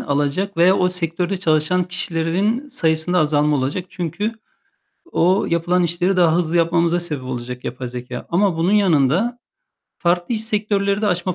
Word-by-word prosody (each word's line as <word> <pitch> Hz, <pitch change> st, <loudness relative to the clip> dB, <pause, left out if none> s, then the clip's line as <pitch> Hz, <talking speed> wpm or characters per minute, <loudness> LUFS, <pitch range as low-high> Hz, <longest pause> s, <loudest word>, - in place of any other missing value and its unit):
alacak 145 Hz, +8 st, -1 dB
veya 180 Hz, +3 st, +4 dB
o 180 Hz, -, +2 dB
sektörde 180 Hz, +1 st, -2 dB
çalışan 165 Hz, +1 st, +1 dB
kişilerinin 180 Hz, -, -1 dB
sayısında 170 Hz, -, +2 dB
azalma 150 Hz, -1 st, +2 dB
olacak. 140 Hz, +7 st, -2 dB
Çünkü 185 Hz, +5 st, -3 dB, 0.8 s
o 185 Hz, +4 st, +2 dB
yapılan 175 Hz, +2 st, +1 dB
işleri 175 Hz, +3 st, 0 dB
daha 170 Hz, -3 st, +4 dB
hızlı 170 Hz, -1 st, 0 dB
yapmamıza 170 Hz, +1 st, +2 dB
sebep 155 Hz, -6 st, -2 dB
olacak 125 Hz, 0 st, -6 dB
yapay 125 Hz, 0 st, -5 dB
zekâ 125 Hz, 0 st, -7 dB
ama 180 Hz, 0 st, +1 dB
bunun 170 Hz, +4 st, +1 dB
yanında 195 Hz, -, +2 dB, 0.6 s
farklı 175 Hz, +5 st, 0 dB
iş 220 Hz, 0 st, -2 dB
sektörleri 205 Hz, -1 st, 0 dB
de -, -, +2 dB
açma 180 Hz, -1 st, -1 dB
175 Hz, 150 wpm, -20 LUFS, 155-190 Hz, 0.8 s, veya